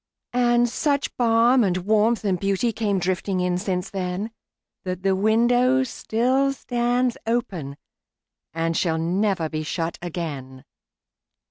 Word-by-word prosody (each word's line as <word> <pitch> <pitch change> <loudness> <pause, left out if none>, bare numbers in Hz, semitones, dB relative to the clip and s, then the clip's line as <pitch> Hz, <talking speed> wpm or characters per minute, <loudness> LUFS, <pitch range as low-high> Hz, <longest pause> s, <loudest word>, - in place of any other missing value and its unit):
And 240 -1 +3
such 280 +3 -1
balm 235 +1 +4
and 185 -3 +1
warmth 215 +4 +1
and 185 -3 0
beautyCame 200 0 0
drifting 185 +1 -1
in 180 0 0
since 185 -1 -3
then, 190 +3 -3 0.5
That 185 0 -4
the 195 -1 +2
window 245 +5 +3
still 260 +3 0
stands 245 -1 0
openAnd 185 - -2 1.0
shall 165 -1 0
never 180 +1 0
be 155 0 -4
shut 165 +2 -3
again. 145 -7 -6
200 Hz, 115 wpm, -23 LUFS, 180-240 Hz, 1.0 s, balm